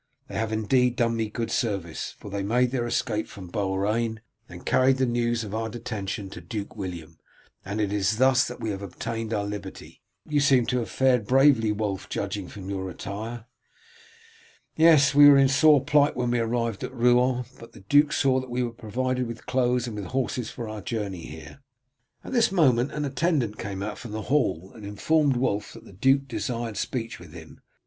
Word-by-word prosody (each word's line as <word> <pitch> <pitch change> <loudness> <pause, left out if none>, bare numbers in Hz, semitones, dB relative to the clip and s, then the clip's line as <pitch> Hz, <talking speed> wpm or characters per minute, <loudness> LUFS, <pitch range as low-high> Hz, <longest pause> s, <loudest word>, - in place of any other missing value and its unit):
'They - - -7
have 110 0 -1
indeed 125 +3 +2
done 115 -1 +1
me 110 -1 -1
good 115 +2 -4
service, 100 -9 -2
for 100 - -10
they 100 0 -2
made 120 +5 +1
their 120 -3 -1
escape 110 -2 -1
from 95 -4 -11
Beaurain 105 +4 -1 0.3
and 90 0 -11
carried 130 +1 +3
the 130 - +2
news 120 -1 0
of 105 -2 -7
our 110 0 -2
detention 105 -4 -5
to - - -9
Duke 105 -4 -6
William, 85 -5 -7 0.4
and 100 +3 -4
it 105 -1 0
is 105 +1 +1
thus 130 +1 +4
that 125 - -8
we 110 - -2
have 100 -1 -5
all 100 - -5
obtained 115 +5 -5
our 105 -2 -1
liberty.' 105 0 -8 0.3
You 150 -1 +1
seem 135 -4 +4
to 125 0 0
have 115 - -4
fared 125 -5 +2
bravely, 130 -4 +4
Wulf, 105 -3 -3
judging 100 -1 -3
from 95 -1 -9
your 95 -1 -3
attire." 110 +5 -6 1.3
"Yes, 155 -4 +6
we 145 0 +9
were 140 - +7
in 135 0 +6
sore 145 +1 +5
plight 145 0 +3
when 125 -1 -1
we 120 - +1
arrived 115 -2 -1
at - - -4
Rouen, 125 +1 +3
but 115 - -13
the - - -14
duke 145 +9 +4
saw 130 -3 +2
that 130 -1 -8
we 125 +1 -1
were 120 - -2
provided 125 +3 -2
with 115 0 -8
clothes 125 -1 +1
and 115 -3 -6
with 105 -2 -5
horses 125 +2 -2
for 115 - -6
our 110 -1 -6
journey 100 -5 -4
here." 80 - -11 0.6
At - - -7
this 235 -5 +3
moment 135 -8 +3
an 150 -1 -3
attendant 135 -6 0
came 100 -1 -4
out 105 +1 -5
from 120 -4 -8
the 110 0 -4
hall 95 - 0
and 110 - -12
informed 140 +8 +1
Wulf 105 -5 -1
that - - -13
the - - -14
duke 135 +7 +2
desired 120 -4 -3
speech 115 +1 -3
with - - -13
him. - - -12
115 Hz, 200 wpm, -26 LUFS, 105-130 Hz, 1.3 s, we